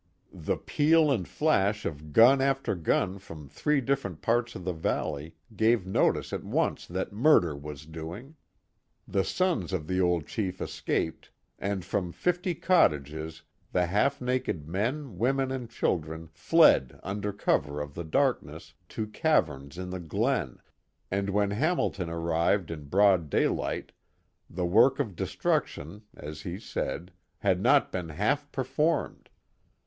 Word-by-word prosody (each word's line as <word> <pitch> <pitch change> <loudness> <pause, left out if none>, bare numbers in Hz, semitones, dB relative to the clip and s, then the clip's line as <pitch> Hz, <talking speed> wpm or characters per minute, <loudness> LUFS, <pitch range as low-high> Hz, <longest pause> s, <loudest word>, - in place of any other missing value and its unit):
The - - -2
peal 155 0 +3
and 105 -10 0
flash 105 -9 +1
of 75 0 -5
gun 125 - +7
after 135 -2 +1
gun 90 +2 0
from 80 -6 -11
three 150 - 0
different 130 - -2
parts 120 +1 +1
of 90 - -7
the 90 - -1
valley 80 -1 -3 0.2
gave 110 -1 +3
notice 95 - +1
at - - -3
once - - -1
that 95 +3 -4
murder 105 - +4
was 70 0 -8
doing. 85 - -8 0.7
The 95 - +1
sons 170 - 0
of 80 -5 -2
the 95 +3 0
old 90 -4 +1
chief 95 -4 -3
escaped, 80 - -3 0.3
and 100 -2 -2
from 90 -4 -2
fifty 180 0 0
cottages 80 - +1 0.3
the 90 -1 +2
half 105 +10 +1
naked 125 - -2
men, 115 - -2
women, 135 +3 +1
and 125 -3 -4
children 80 -6 -2
fled 65 -3 +4
under 100 +2 -3
cover 75 -7 0
of 75 -1 -5
the 85 - -5
darkness 80 - -1 0.2
to 110 - -3
caverns 85 - 0
in 90 0 -5
the 95 - -4
glen, 100 - -1 0.5
and 100 +1 -1
when 100 0 +1
Hamilton 105 - 0
arrived 85 +2 0
in 75 -3 -7
broad 95 -1 +3
daylight - - 0 0.6
the 90 +1 -2
work 115 +10 +4
of 110 -10 -2
destruction, 80 +3 -2 0.2
as 75 +1 -8
he 90 +1 -5
said, 90 -3 -4 0.3
had 95 -4 +1
not 140 +6 +4
been 90 -3 -4
half 135 - -1
performed. 150 +5 -1
95 Hz, 145 wpm, -28 LUFS, 80-125 Hz, 0.7 s, gun